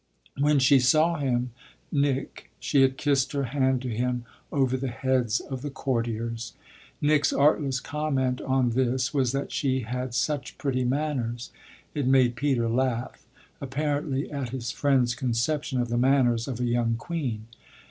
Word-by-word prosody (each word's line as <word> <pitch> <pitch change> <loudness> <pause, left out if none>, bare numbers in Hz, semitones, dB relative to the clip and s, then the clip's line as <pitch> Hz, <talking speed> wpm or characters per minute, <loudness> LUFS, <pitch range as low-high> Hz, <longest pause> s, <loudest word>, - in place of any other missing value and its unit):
When 145 +1 +4
she 135 +1 +5
saw 155 +6 +3
him, 125 -3 0 0.4
Nick, 140 -2 -1
she 140 - +2
had 135 0 +3
kissed 140 -1 +1
her 140 -1 0
hand 130 0 0
to - - -3
him 125 +1 -1 0.3
over 130 -2 +1
the 130 +1 -2
heads 125 -3 0
of 130 -3 -6
the 145 - -4
courtiers. 115 -3 -3 0.5
Nick's 145 0 +3
artless 140 -2 +2
comment 135 -4 -1
on 130 -2 +1
this 125 +1 0
was 130 -4 +2
that 140 +1 -2
she 130 -2 0
had 125 +2 -4
such 145 0 -1
pretty 130 -3 -1
manners. 125 -4 -2 0.4
It 145 -4 -1
made 130 -2 +4
Peter 125 -3 +1
laugh 125 +1 -2 0.3
apparently 145 0 -2
at 140 -4 -3
his 120 -1 -4
friend's 130 -4 +2
conception 130 +3 -1
of 120 -1 -1
the 120 0 0
manners 125 -3 +3
of 125 -3 -4
a 125 - 0
young 120 -1 +1
queen. 120 -5 -4
130 Hz, 155 wpm, -26 LUFS, 120-140 Hz, 0.5 s, she